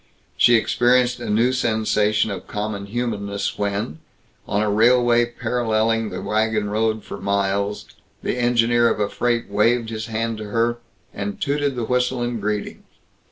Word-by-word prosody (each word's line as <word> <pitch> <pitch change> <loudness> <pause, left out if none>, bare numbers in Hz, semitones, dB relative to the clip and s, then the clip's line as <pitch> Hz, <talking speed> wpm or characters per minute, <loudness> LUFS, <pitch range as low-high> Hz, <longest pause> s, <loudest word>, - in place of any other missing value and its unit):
She 120 - +5
experienced 120 +2 +2
a 120 - -5
new 115 +5 +2
sensation 110 -3 +1
of 95 -3 -7
common 105 -1 -4
humanness 100 -3 -3
when, 100 -6 -2 0.5
on 105 +1 0
a 105 - 0
railway 120 +2 +4
paralleling 115 -2 0
the 90 -1 -6
wagon 110 -1 0
road 110 0 0
for 100 - -8
miles, 100 +1 -1 0.4
the - - -1
engineer 120 -1 +3
of - - -1
a 105 -1 0
freight 120 -1 -1
waved 115 +3 +1
his 110 0 -4
hand 115 0 -2
to 110 - -6
her, 115 +3 0 0.3
and 205 +1 -5
tooted 145 -3 0
the 120 -2 -2
whistle 125 +1 0
in 120 -1 -2
greeting. 105 0 -3
110 Hz, 155 wpm, -22 LUFS, 105-120 Hz, 0.5 s, She